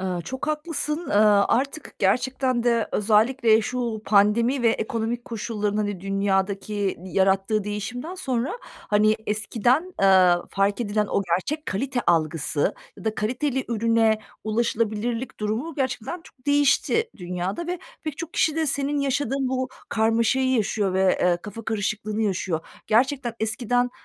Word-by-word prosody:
Iıı, 185 -2 -2
çok 260 - -5
haklısın. 305 0 -2
Iıı, 205 -1 +5
artık 275 +4 -1
gerçekten 250 +4 +1
de 235 -2 +2
özellikle 220 +2 +3
şu 235 -2 -3
pandemi 230 +5 +3
ve 230 - +5
ekonomik 230 +1 -2
koşulların, 210 -2 -3
hani, 205 -3 -2
dünyadaki 195 +1 -1
yarattığı 195 +2 +1
değişimden 245 - -4
sonra, 265 - -2
hani, 215 - +1
eskiden, 240 - +1
ııı, 185 -2 +5
fark 200 +3 +1
edilen 210 -1 0
o 200 - 0
gerçek 190 - -2
kalite 255 +6 -1
algısı 155 -3 +1 0.2
ya - - -12
da 220 - 0
kaliteli 255 +5 -1
ürüne 225 -1 +2 0.3
ulaşılabilirlik 230 +2 -1
durumu 230 +10 -2
gerçekten 265 +4 -3
çok 255 +1 -20
değişti 290 - +2
dünyada 180 - -4
ve 355 +1 -3 0.2
pek 310 -2 -5
çok 335 -1 -6
kişi 315 0 +1
de 320 - +1
senin 285 +1 -1
yaşadığın 275 -1 0
bu 260 0 -1 0.2
karmaşayı 230 +4 +2
yaşıyor 205 -4 0
ve, 190 0 +3
eee, 180 -1 +3
kafa 210 +2 -8
karışıklığını 215 0 -2
yaşıyor. 185 -5 -1 0.3
Gerçekten 250 +1 +2
eskiden, 245 +3 0
225 Hz, 135 wpm, -24 LUFS, 205-260 Hz, 0.3 s, Iıı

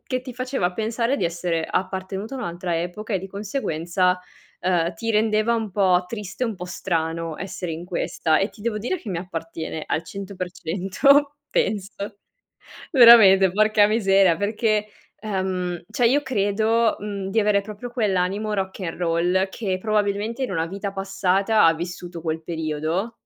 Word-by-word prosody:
che 255 -1 -1
ti 255 -1 -8
faceva 255 -7 -1
pensare 230 +5 -1
di 180 - -1
essere 170 -1 -1
appartenuta 190 +5 -3
a - - -6
un'altra 175 -5 -3
epoca 210 +5 -4
e - - +2
di 190 - -7
conseguenza, 185 - -1 0.4
ehm, 175 -1 +1
ti 225 +7 -3
rendeva 215 +1 +2
un 220 -4 -4
po' 185 -3 +3
triste, 210 +3 -4
un 225 -3 -2
po' 180 - -7
strano 165 -3 -2
essere 180 -2 -5
in 165 +2 -6
questa. 165 -3 0
E 195 - +1
ti 215 - -18
devo 220 -1 -2
dire 250 - -2
che 240 - -10
mi 175 - -2
appartiene 165 -2 -5
al 160 - -2
100% 195 - +1 0.2
penso. 200 -1 -1 1.0
Veramente, 215 - +8
porca 215 +1 +4
miseria, 195 -5 +4
perché, 210 +1 0 0.3
ehm, 185 -4 -2
cioè 245 - +2
io 285 +5 +3
credo, 220 -1 +1
mhmm, 200 -2 -4
di 225 - +2
avere 205 -1 +2
proprio 215 +4 -8
quell'animo 210 -2 0
rock 190 0 -3
n'roll, 175 +2 0
che 190 -2 -3
probabilmente 215 +3 -1
in 230 - -4
una 165 -2 0
vita 195 +3 -5
passata 195 +2 +2
ha 165 - +6
vissuto 175 +1 -6
quel 160 0 -3
periodo 160 +6 -2
195 Hz, 155 wpm, -23 LUFS, 175-215 Hz, 1.0 s, Veramente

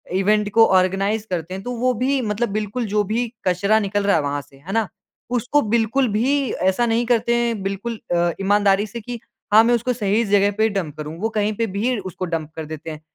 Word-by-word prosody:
Event 210 +2 +2
को 225 +1 +7
organise 195 +3 +1
करते 175 0 -3
हैं। 195 - -7
तो 245 - -4
वो 255 +2 +1
भी 260 +3 0
मतलब 220 0 -1
बिल्कुल 215 +3 -2
जो 210 +1 +1
भी 240 +2 0 0.2
कचरा 200 +4 +3
निकल 205 0 -1
रहा 200 - +4
है - - +1
वहाँ 145 0 -2
से, 135 - -20
है 155 +8 -9
ना? 225 -3 +1 0.4
उसको 245 +4 +1
बिल्कुल 235 +4 +2
भी 255 +5 +1
ऐसा 190 +6 +1
नहीं 235 +1 +1
करते 235 0 +2
हैं 235 -3 0
बिल्कुल 200 +4 -4 0.2
अ, 170 0 +2
ईमानदारी 200 0 +3
से 235 +3 -7
कि 240 +2 -6 0.3
हाँ 220 +1 +8
मैं 240 +1 +3
उसको 245 +2 -1
सही 215 0 +1
जगह 200 0 +3
पे 220 +1 +3
डंप 180 -8 -3
करूँ। 155 +2 -6
वो 225 - 0
कहीं 210 +1 +1
पे 230 - +1
भी 245 +4 0
उसको 185 -1 -5
डंप 165 -3 -4
कर 160 - -5
देते 155 +1 -7
हैं। 155 -1 -9
210 Hz, 225 wpm, -21 LUFS, 190-235 Hz, 0.4 s, हाँ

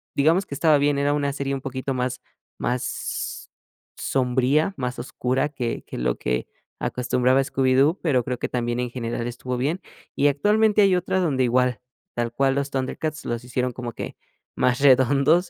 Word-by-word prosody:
digamos 165 +7 +3
que - - -8
estaba 155 +1 +4
bien, 145 0 +2
era 145 +1 +2
una 145 -1 0
serie 140 0 -3
un 135 - -3
poquito 135 0 -3
más 125 0 -2 0.4
más 125 0 -1
s - - -4 0.5
sombría, 130 +6 +1
más 125 -2 -3
oscura 130 +2 -1
que 125 -5 -3
que - - -7
lo - - 0
que 60 0 -2 0.3
acostumbraba 125 +1 +2
Scooby-Doo, 135 +4 +2
pero, 130 -8 +2
creo 125 -1 -2
que - - -3
también 120 0 -1
en 125 - -2
general 120 -1 -3
estuvo 125 +1 -4
bien. 145 +9 -1 0.4
Y 145 - +3
actualmente 210 +9 +3
hay 195 -2 +5
otra 180 +1 0
donde 140 -7 +1
igual, 125 0 +2 0.3
tal 120 -1 -2
cual 135 +1 +2
los 140 0 -1
ThunderCats, 145 +3 -3
los 120 0 -4
hicieron 125 0 -1
como 120 -1 -6
que - - -6 0.4
más 125 +2 +2
redondos, 140 +6 +4
130 Hz, 175 wpm, -24 LUFS, 125-145 Hz, 0.5 s, hay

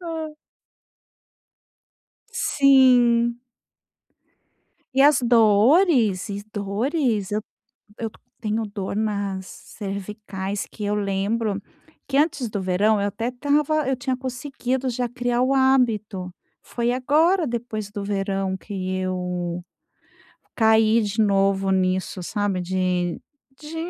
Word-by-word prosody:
Hã. 325 -3 -5 2.0
Sim. 245 -4 +4 1.6
E 270 - +3
as 290 -2 +5
dores? 230 - +4
E 200 0 -5
dores 215 - -1
eu 210 +1 0
t - - -22 0.5
eu 225 -1 -3 0.3
tenho 220 +1 -1
dor 200 -1 -5
nas 200 -3 -2
cervicais 200 -1 -6
que 210 - -7
eu 205 +1 0
lembro 205 +1 -1 0.5
que 275 - -1
antes 290 -5 +1
do 205 -1 -3
verão 200 +4 +2
eu 200 - 0
até 225 +4 -3
estava 290 +3 +1
eu 265 - +2
tinha 260 0 -2
conseguido 260 0 -3
já 245 0 -2
criar 245 0 -1
o 260 +1 +2
hábito. 220 -8 +1 0.3
Foi 235 0 -2
agora 310 +7 +2
depois 225 -4 -4
do 205 -1 -5
verão 195 -1 -1
que 185 -1 -4
eu 180 -1 -3 0.9
caí 220 0 +4
de 210 +1 -1
novo 195 -1 +2
nisso, 185 0 0
sabe, 205 0 -1
de 180 -1 -1 0.4
de 305 +2 -9
215 Hz, 115 wpm, -23 LUFS, 195-255 Hz, 2.0 s, as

